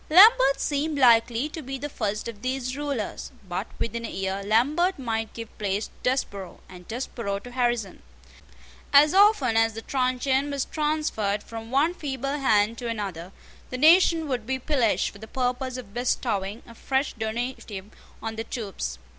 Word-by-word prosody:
Lambert 390 - +7
seemed 295 +1 -1
likely 240 0 +4
to 320 - -7
be 270 -1 -5
the 290 +3 -4
first 215 -6 -3
of 215 -3 -8
these 255 0 -2
rulers; 280 -7 -4 0.2
but 185 +4 -3
within 230 0 -3
a - - -4
year 195 +1 -3
Lambert 290 - +2
might 225 -4 -2
give 230 -1 -8
place 205 0 -1
to - - -28
Desborough, 200 -7 -2
and 180 -1 -13
Desborough 230 -4 -3
to 245 +5 -10
Harrison. 240 -6 -1 0.9
As 295 +3 +7
often 385 - +5
as 225 0 +3
the 225 +1 -7
truncheon 265 +1 0
was 280 -2 -1
transferred 295 -10 -1
from 225 0 -8
one 285 +7 +2
feeble 275 -3 -3
hand 220 -3 +2
to 245 - -4
another, 195 -6 -4 0.4
the 255 - -4
nation 325 +2 +5
would 245 -5 -3
be 265 0 0
pillaged 260 -4 +1
for 200 - -14
the 220 - -9
purpose 255 +1 -2
of 230 -6 -9
bestowing 220 -4 -1
a 235 - -13
fresh 265 +4 -1
donative 220 -3 -4 0.3
on 220 0 -4
the 225 - -2
troops. 195 - -5
245 Hz, 165 wpm, -26 LUFS, 220-275 Hz, 0.9 s, Lambert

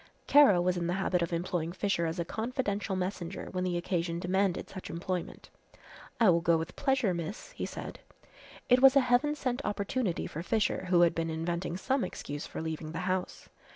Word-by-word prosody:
Kara 275 -11 +7
was 180 +1 +1
in 170 -1 -1
the 175 - 0
habit 190 -2 0
of 170 - -1
employing 170 -1 -2
Fisher 190 -3 0
as 165 +2 -3
a 170 - -1
confidential 220 -2 -2
messenger 185 -1 -4
when 185 -1 -2
the 180 -1 0
occasion 170 -1 -1
demanded 185 +1 0
such 190 - -8
employment. 175 +1 -5 0.7
"I 225 -6 +6
will 170 0 +2
go 170 -1 +3
with 165 +2 -5
pleasure, 265 -8 +1
miss," 175 - -5
he - - -4
said. - - -7 0.7
It 250 +1 +5
was 270 0 +8
a - - +8
heaven 250 +4 +2
sent 260 -1 -2
opportunity 205 -1 -1
for 155 - -5
Fisher, 210 0 0
who 175 -1 +5
had 170 -1 +5
been 165 0 -2
inventing 170 +2 -2
some 260 +6 0
excuse 145 +1 -5
for - - -6
leaving 160 0 -5
the 165 - -3
house. 185 -1 -2
180 Hz, 190 wpm, -30 LUFS, 170-215 Hz, 0.7 s, was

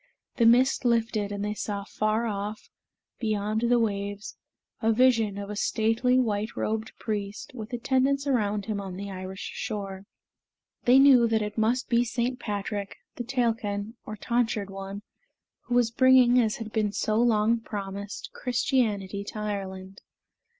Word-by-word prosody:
The 230 - +5
mist 250 +4 +4
lifted, 225 -4 +1
and 205 0 -3
they 210 - -1
saw 205 -1 -4
afar 215 +3 -1
off, 210 0 -4 0.5
beyond 215 -1 -1
the 240 +1 +3
waves, 205 -2 -2 0.5
a 225 - +3
vision 225 -4 +3
of 200 0 -5
a - - -4
stately 225 +4 +1
white 220 -3 0
robed 220 0 -2
priest, 205 -2 -4
with 225 -2 -8
attendants 265 +3 +1
around 210 -7 0
him 210 -2 -2
on 190 -2 -6
the 200 0 -6
Irish 185 0 -6
shore. 195 -2 -5 0.8
They 250 +2 +7
knew 265 -4 +7
that 220 -1 +1
it 210 0 -5
must 230 +3 +1
be 235 0 +3
St. 245 +1 -2
Patrick, 205 -2 -4 0.2
the 245 - -3
Tailkenn, 225 -4 -1
or 215 - -7
Tonsured 225 -2 -1
One, 195 +1 -7 0.6
who 245 - -1
was 240 -2 +3
bringing, 255 0 +6
as 220 -2 0
had 225 -2 -7
been 215 -2 +1
so 215 +1 0
long 230 -1 +3
promised, 200 -2 -6
Christianity 215 -6 0
to 215 - -7
Ireland. 195 -2 -5
215 Hz, 150 wpm, -27 LUFS, 205-240 Hz, 0.8 s, They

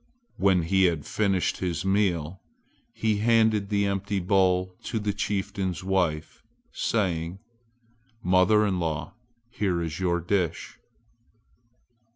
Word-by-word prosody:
When 95 -3 +3
he 95 +3 +3
had 80 -5 0
finished 95 -4 0
his 85 -3 -3
meal 95 -4 0 0.5
he 110 -2 0
handed 110 -2 +2
the 100 -1 +1
empty 100 0 -1
bowl 95 0 +2
to - - -2
the 105 -1 -1
chieftain's 100 -3 -2
wife, 90 -5 -1 0.3
saying, 90 -5 -1 0.9
"Mother 95 +3 +4
in 95 -3 0
law, 80 -3 -3 0.4
here 95 -6 -1
is 80 -1 -4
your 90 -2 +1
dish!" 85 -1 -2
95 Hz, 115 wpm, -26 LUFS, 85-100 Hz, 0.9 s, Mother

